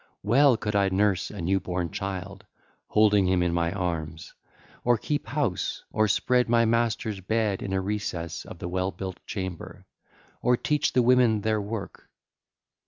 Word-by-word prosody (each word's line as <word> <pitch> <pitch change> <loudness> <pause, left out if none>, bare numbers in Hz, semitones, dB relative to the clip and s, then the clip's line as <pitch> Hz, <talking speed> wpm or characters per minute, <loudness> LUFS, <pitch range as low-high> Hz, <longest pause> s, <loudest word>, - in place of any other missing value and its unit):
Well 130 +3 +5
could 105 -1 -3
I 100 -1 +3
nurse 95 0 +1
a - - -7
new 95 +3 +1
born 90 -2 -3
child, 95 +1 -5 0.4
holding 105 -3 +4
him 90 -1 +2
in 85 -1 0
my 85 -1 +1
arms, 85 -4 -4 0.5
or 120 -1 +3
keep 145 +6 -3
house, 140 -11 -2
or 110 0 +2
spread 125 +3 +2
my 115 0 +4
masters' 110 -3 0
bed 105 0 0
in 95 - -4
a 95 - +1
recess 95 -4 -3
of - - -10
the 85 - -5
well 95 +1 -1
built 95 -1 -7
chamber, 95 -5 -6 0.6
or 125 0 +3
teach 150 +2 0
the 125 - +4
women 120 -3 +4
their 110 0 0
work. 105 0 -7
100 Hz, 165 wpm, -26 LUFS, 95-115 Hz, 0.6 s, Well